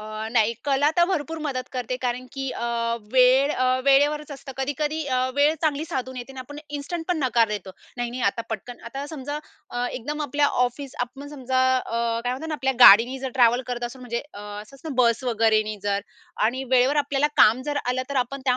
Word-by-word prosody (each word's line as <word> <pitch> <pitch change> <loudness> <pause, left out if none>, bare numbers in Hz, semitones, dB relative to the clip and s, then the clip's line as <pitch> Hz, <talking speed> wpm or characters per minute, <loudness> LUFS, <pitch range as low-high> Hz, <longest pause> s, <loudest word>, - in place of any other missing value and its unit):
अ, 215 +1 -6
नाही 220 0 +4
कला 285 +1 +3
तर 345 - +6
भरपूर 325 -3 -2
मदत 255 -3 -3
करते 250 0 -3
कारण, 250 +1 -2
की 270 -1 -4
अ, 235 - -4 0.5
वेळ 260 +2 +5
अ, 255 - 0 0.2
वेळेवरच 290 +2 +3
असतं. 270 -1 -9
कधी-कधी 295 +3 -2
अ, 255 -2 0 0.2
वेळ 295 +2 +4
चांगली 305 0 +1
साधून 260 -5 -4
येते 250 +2 -7
आणि 265 - -11
आपण 290 +3 -9 0.2
इन्स्टंट 325 +3 -5
पण 350 -3 +1
नकार 235 -3 +3
देतो. 205 -3 -5 0.3
"नाही-नाही 240 +1 -3
आता 230 +3 +1
पटकन" 230 +3 -6
आता 275 +4 -6
समजा 290 0 -4 0.3
अ, 245 0 -2
एकदम 295 +5 -4
आपल्या 285 +1 +1 0.2
ऑफिस 270 +2 -8
आपण 280 +3 -11
समजा 260 -2 -1 0.2
अ, 230 - -6 0.3
काय 245 - 0
म्हणतात 310 +5 -6
ना, 310 - -2
आपल्या 265 -1 0
गाडीनी 240 +5 +8
जर 265 -1 -4
ट्रॅव्हल 245 0 +4
करत 245 -1 -3
असू 240 +2 -6
म्हणजे 235 -1 -3
अ, 205 - -8
असं 210 +4 -9
असत 270 - -24
ना, 285 - -4
बस 235 +2 +2
वगैरेने 215 -2 +2
जर 200 -1 0 0.5
आणि 260 +3 -2
वेळेवर 260 +3 +4
आपल्याला 285 0 +2
काम 230 +4 +6
जर 290 - -1
आलं 250 +1 0
तर, 280 - -2
आपण 260 +2 -1
त्या 250 -1 +3
255 Hz, 205 wpm, -24 LUFS, 240-285 Hz, 0.5 s, गाडीनी